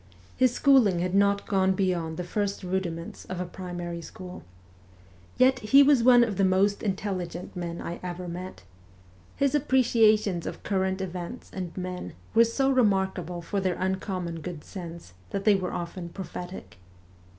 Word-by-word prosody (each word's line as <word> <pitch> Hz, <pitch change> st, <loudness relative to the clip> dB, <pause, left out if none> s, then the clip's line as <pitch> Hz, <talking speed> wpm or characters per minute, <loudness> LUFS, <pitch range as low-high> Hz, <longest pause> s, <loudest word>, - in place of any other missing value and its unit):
His 255 Hz, -1 st, +4 dB
schooling 245 Hz, -8 st, +4 dB
had 180 Hz, +1 st, -1 dB
not 200 Hz, 0 st, +3 dB
gone 190 Hz, -2 st, +2 dB
beyond 175 Hz, -4 st, -1 dB
the 180 Hz, -, -3 dB
first 200 Hz, +2 st, -2 dB
rudiments 180 Hz, -2 st, -3 dB
of 185 Hz, -1 st, -5 dB
a 180 Hz, -, -2 dB
primary 175 Hz, -1 st, -6 dB
school. 180 Hz, +2 st, -9 dB, 1.0 s
Yet 255 Hz, 0 st, +4 dB
he 270 Hz, +6 st, +6 dB
was 280 Hz, -3 st, +5 dB
one 245 Hz, 0 st, +7 dB
of 215 Hz, -5 st, -2 dB
the 195 Hz, -, +2 dB
most 195 Hz, +2 st, +3 dB
intelligent 185 Hz, -4 st, -3 dB
men 170 Hz, -1 st, -4 dB
I 170 Hz, -, -5 dB
ever 180 Hz, 0 st, -5 dB
met. 180 Hz, -, -7 dB, 0.7 s
His 280 Hz, 0 st, +1 dB
appreciations 225 Hz, -, +3 dB
of -, -, -7 dB
current 190 Hz, -1 st, 0 dB
events 180 Hz, -2 st, -6 dB
and 180 Hz, -2 st, -6 dB
men 180 Hz, -, -5 dB, 0.2 s
were 230 Hz, +1 st, +6 dB
so 270 Hz, +4 st, +1 dB
remarkable 190 Hz, -, +1 dB
for 200 Hz, +4 st, -2 dB
their 185 Hz, -2 st, 0 dB
uncommon 185 Hz, -2 st, -2 dB
good 170 Hz, -2 st, -6 dB
sense 170 Hz, -, -9 dB, 0.2 s
that 195 Hz, -, -4 dB
they 210 Hz, -, +6 dB
were 185 Hz, -2 st, -1 dB
often 170 Hz, 0 st, -5 dB
prophetic. 180 Hz, -, -8 dB
190 Hz, 155 wpm, -27 LUFS, 175-205 Hz, 1.0 s, one